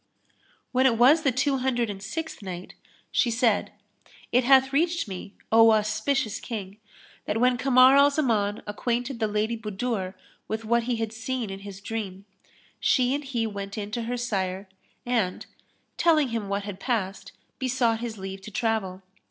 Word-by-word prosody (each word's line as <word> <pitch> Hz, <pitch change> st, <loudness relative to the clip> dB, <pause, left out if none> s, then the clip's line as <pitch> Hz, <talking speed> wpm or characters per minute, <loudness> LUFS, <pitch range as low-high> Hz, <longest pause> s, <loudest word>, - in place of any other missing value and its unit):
When 260 Hz, +1 st, +4 dB
it 230 Hz, -3 st, +2 dB
was 275 Hz, +7 st, +6 dB
the 280 Hz, -4 st, +2 dB
Two 270 Hz, +2 st, +1 dB
Hundred 245 Hz, -2 st, 0 dB
and 200 Hz, -2 st, -6 dB
Sixth 320 Hz, -, -5 dB
Night, 185 Hz, -2 st, -7 dB, 0.4 s
She 245 Hz, -, +2 dB
said, 230 Hz, -2 st, +1 dB, 0.6 s
It 250 Hz, +1 st, +4 dB
hath 265 Hz, +1 st, +5 dB
reached 335 Hz, 0 st, +1 dB
me, 195 Hz, +1 st, -8 dB, 0.2 s
O 225 Hz, 0 st, +7 dB
auspicious 215 Hz, +3 st, 0 dB
King, 205 Hz, -4 st, -6 dB, 0.5 s
that 225 Hz, -, -1 dB
when 250 Hz, +1 st, +4 dB
Kamar 255 Hz, +1 st, +6 dB
al 280 Hz, +1 st, +7 dB
Zaman 225 Hz, -8 st, 0 dB
acquainted 240 Hz, +4 st, -2 dB
the 220 Hz, -, +1 dB
Lady 215 Hz, +2 st, 0 dB
Budur 210 Hz, -3 st, -3 dB, 0.3 s
with 220 Hz, +1 st, -4 dB
what 235 Hz, +1 st, +2 dB
he 245 Hz, -1 st, 0 dB
had 225 Hz, -1 st, -3 dB
seen 225 Hz, -1 st, -3 dB
in 195 Hz, -, -6 dB
his 200 Hz, -1 st, -9 dB
dream, 200 Hz, -3 st, -5 dB, 0.5 s
she 255 Hz, -1 st, +3 dB
and 290 Hz, +1 st, -2 dB
he 245 Hz, -5 st, -2 dB
went 200 Hz, -1 st, -5 dB
in 205 Hz, -1 st, -4 dB
to 235 Hz, -, -2 dB
her 245 Hz, +1 st, -2 dB
sire 195 Hz, -5 st, -2 dB, 0.4 s
and, 225 Hz, -7 st, -1 dB, 0.5 s
telling 310 Hz, -5 st, +3 dB
him 225 Hz, -4 st, -3 dB
what 200 Hz, 0 st, -1 dB
had 200 Hz, -2 st, -7 dB
passed, 205 Hz, -6 st, -2 dB, 0.3 s
besought 245 Hz, -3 st, +1 dB
his 230 Hz, -2 st, -5 dB
leave 190 Hz, 0 st, -7 dB
to 205 Hz, -, -9 dB
travel. 205 Hz, -4 st, -2 dB
225 Hz, 170 wpm, -26 LUFS, 205-255 Hz, 0.6 s, O